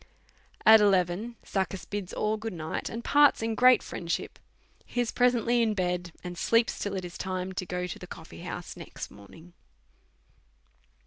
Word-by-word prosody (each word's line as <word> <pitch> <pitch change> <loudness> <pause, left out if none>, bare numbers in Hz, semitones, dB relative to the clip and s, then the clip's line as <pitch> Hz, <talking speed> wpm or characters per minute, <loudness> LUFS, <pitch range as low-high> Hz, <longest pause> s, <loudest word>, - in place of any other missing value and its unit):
At 220 0 +9
eleven, 195 +3 +2
Succus 190 -1 -2
bids 205 -3 -4
all 215 +1 0
good 220 0 -5
night, 160 -2 -4
and 230 +1 -6
parts 290 -5 +5
in 225 0 0
great 250 +1 +6
friendship. 170 -1 -4 0.4
He 245 - -5
is 240 -2 +1
presently 245 -1 +3
in 220 -2 +1
bed, 180 -2 -1
and 180 -1 -6
sleeps 230 0 +2
till 205 -1 -3
it 185 -1 -3
is 175 - -9
time 185 0 -3
to 185 0 -4
go 180 +1 -2
to 180 - -6
the - - -9
coffee - - -10
house - - -6
next - - -8
morning. 160 - -15
195 Hz, 170 wpm, -28 LUFS, 180-230 Hz, 0.4 s, At